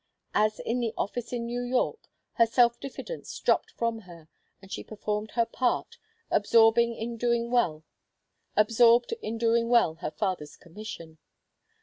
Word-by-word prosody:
As 215 +1 +2
in 235 +2 -2
the 230 -2 -2
office 230 +3 -3
in 240 -1 -3
New 240 +1 -3
York, 245 +1 -1 0.2
her 230 - +4
self 235 0 +3
diffidence 370 - -7
dropped - - +1
from 230 -1 -2
her, 170 -6 -14 0.3
and 190 0 -16
she - - -5
performed 210 0 -4
her 235 -1 +3
part, 245 +1 -1 0.3
absorbed 225 0 +5
in 235 0 -1
doing 235 0 0
well 170 -11 +1 0.7
her 230 - +3
father's 185 -8 -3
commission. 170 -4 -10
230 Hz, 125 wpm, -28 LUFS, 210-235 Hz, 0.7 s, absorbed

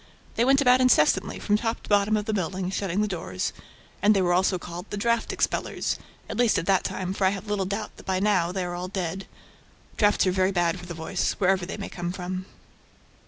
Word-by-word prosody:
They 230 - +1
went 270 +2 +4
about 255 -1 +5
incessantly, 250 -12 +3
from 210 0 +1
top 225 0 -2
to - - -12
bottom 205 +1 +3
of 210 - -3
the 220 - -1
building, 185 -1 -2
shutting 195 0 -1
the 210 - +1
doors; 95 - -3 0.5
and 205 +2 +5
they 195 - +3
were 175 0 +2
also 185 +1 +2
called 175 +2 -8
"The 205 - -4
draft 235 +2 +1
expellers," - - -1 0.3
at 220 - -5
least 240 -2 +3
at - - -1
that 195 -1 +3
time, 185 0 -3
for 195 - 0
I - - +5
have 195 +1 -4
little 205 -2 -1
doubt 205 +2 -4
that - - -13
by 190 -1 +1
now 185 -4 +2
they 185 0 -2
are 175 - -4
all 175 +1 -4
dead. 190 0 -4 0.7
Drafts 205 -2 +3
are 185 - +3
very 185 +1 +2
bad 175 -1 +1
for 175 - -10
the 170 - -6
voice, 160 0 -1
wherever 190 -2 +1
they 195 - -5
may 200 - -5
come 175 -1 -4
from. 185 +1 -5
190 Hz, 230 wpm, -26 LUFS, 180-210 Hz, 0.7 s, about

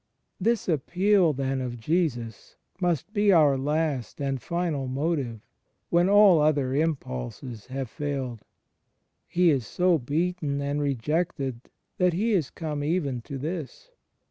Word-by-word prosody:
This 225 +3 +1
appeal, 180 +3 +3
then, 135 -1 -2
of 120 -1 -4
Jesus 120 - -2 0.2
must 175 +2 -1
be 205 -1 +4
our 150 -6 +5
last 145 -2 -1
and 135 -2 -2
final 165 -3 -2
motive, 135 -4 -2 0.5
when 175 +2 +4
all 200 -4 +7
other 145 -4 +2
impulses 125 - -3
have 130 0 -4
failed. 130 -4 -4 0.9
He 175 -1 +3
is 130 -7 0
so 180 - +2
beaten 150 +2 -1
and 140 +1 -1
rejected 140 -1 -2 0.3
that 180 -1 +3
He 215 +7 0
is 175 -9 +1
come 150 -3 -4
even 145 -6 -1
to 140 +3 -7
this. 160 - -6
150 Hz, 130 wpm, -26 LUFS, 130-175 Hz, 0.9 s, all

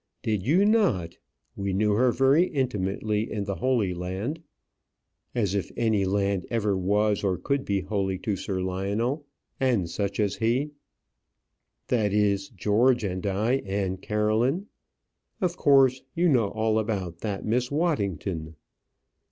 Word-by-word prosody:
"Did 105 -3 0
you 170 - +3
not? 185 - +2 0.4
We 100 -1 -2
knew 105 +2 +2
her 120 +4 +3
very 135 +7 +4
intimately 105 -5 -1
in 105 - -2
the 100 0 -3
Holy 110 -3 +1
Land" 95 - -4 0.9
as 105 -6 +1
if 100 -2 -1
any 110 -4 +2
land 100 -1 0
ever 105 -4 0
was 105 +3 +1
or 95 -2 +1
could 140 +9 -1
be 100 -1 0
holy 95 0 -1
to 100 +2 -2
Sir 95 0 -3
Lionel 105 +10 -2 0.3
and 120 -10 +2
such 100 +4 -3
as 105 -2 0
he. 125 +6 0 1.2
"That 110 -5 +1
is, 100 -2 +1
George 115 +4 +2
and 95 -2 -3
I, 110 +7 +1
and 95 -4 -3
Caroline. 110 - +1 0.7
Of 175 -2 0
course, 135 -4 +4
you 175 +2 +3
know 120 -8 +3
all 110 +1 0
about 95 -6 -3
that 100 -1 -4
Miss 125 +3 0
Waddington." 100 - -1
105 Hz, 140 wpm, -26 LUFS, 95-125 Hz, 1.2 s, very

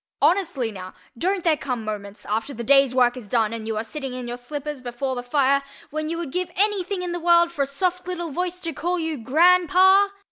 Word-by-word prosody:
Honestly, 310 - +1
now, 185 -2 -9 0.2
don't 370 +7 -1
there 330 -3 +4
come 250 -6 -4
moments, 205 -1 -6
after 225 +6 -2
the 235 - -5
day's 275 0 +4
work 245 -1 +4
is 245 -5 -9
done 225 0 +1
and 225 -1 -6
you 220 -1 -2
are 215 - -1
sitting 265 +2 -6
in 250 -1 -5
your 240 - -4
slippers 290 +3 -6
before 250 +2 -3
the 245 - -3
fire, 275 +2 +2 0.3
when 310 +1 -3
you 335 - -2
would 335 -5 -5
give 360 +2 -2
any 410 -1 +2
thing 365 0 -4
in 355 - -3
the 350 - -3
world 340 0 +4
for 295 - -3
a 275 - +1
soft 360 +5 -2
little 345 -3 -4
voice 360 +4 -3
to 330 -1 -3
call 350 +5 -1
you 320 -4 -3
GRANDPA? 360 - +5
290 Hz, 235 wpm, -23 LUFS, 245-350 Hz, 0.3 s, GRANDPA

